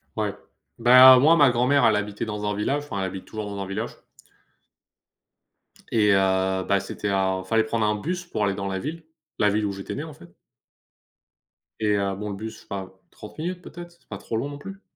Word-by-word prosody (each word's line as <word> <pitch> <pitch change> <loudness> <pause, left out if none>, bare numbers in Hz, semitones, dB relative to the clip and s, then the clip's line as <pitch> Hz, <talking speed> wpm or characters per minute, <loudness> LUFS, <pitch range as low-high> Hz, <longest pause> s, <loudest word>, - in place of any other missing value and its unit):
Ouais. - - -1 0.5
Ben, 125 +2 +9
moi, 155 +5 +6
ma 145 -5 +6
grand-mère, 125 +4 +3
elle 110 - +4
habitait 105 +1 -3
dans 105 -1 -4
un 105 - -2
village. 140 +8 -1
Enfin, 105 -9 -5
elle 95 - -1
habite 95 0 -6
toujours 110 -1 -6
dans 100 -1 -6
un - - -3
village. 105 +4 -4 2.0
Et 105 -3 +4
heu, 95 -1 +1
bah, 100 -1 +2
c'était 100 +1 -5
un 95 -1 0
fallait 110 +4 +2
prendre 110 0 -1
un 105 0 +1
bus 175 - -4
pour 110 -11 -3
aller 100 - 0
dans 100 0 -4
la 95 -1 -3
ville 160 - -6 0.4
la 105 - +4
ville 105 +1 0
où 100 - -1
j'étais 95 0 -6
né, 145 - -4
en 160 - -9
fait. 85 -10 -16 1.5
Et 105 -2 +1
heu, 100 -1 -1
bon, 105 +2 -5
le 100 - -4
bus, 110 +2 -7
je - - -15
sais - - -23
pas 95 -2 -5 0.2
30 105 - -12
minutes 180 +3 -4
peut-être? 175 0 -10
C'est 170 - -28
pas 100 - -6
trop 100 - -6
long, 135 +6 -2
non 145 - -8
plus, 195 +7 -10
105 Hz, 220 wpm, -24 LUFS, 100-135 Hz, 2.0 s, Ben